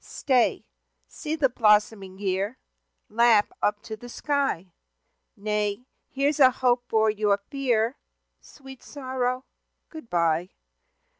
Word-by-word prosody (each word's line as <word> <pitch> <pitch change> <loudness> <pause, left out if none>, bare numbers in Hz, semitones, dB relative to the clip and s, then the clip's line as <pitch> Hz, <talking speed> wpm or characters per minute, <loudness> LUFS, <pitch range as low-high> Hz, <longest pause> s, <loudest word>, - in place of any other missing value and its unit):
Stay! 255 -4 0 0.4
See 310 +1 -5
the 300 -4 +3
blossoming 210 -5 +2
year, 200 +4 -2 0.5
Laugh 225 -1 +3
up 205 0 0
to 220 - -6
the 245 +3 -12
sky. 270 - -2 0.6
Nay, 210 +2 -2 0.2
here's 280 +2 0
a 260 -2 +8
hope 245 -1 +1
for 220 -1 +2
your 210 -1 +1
fear, 250 -3 0 0.4
Sweet 270 -2 -14
sorrow 260 -2 -3 0.4
good 315 -8 -11
bye! 170 0 +1
230 Hz, 115 wpm, -25 LUFS, 205-260 Hz, 0.6 s, a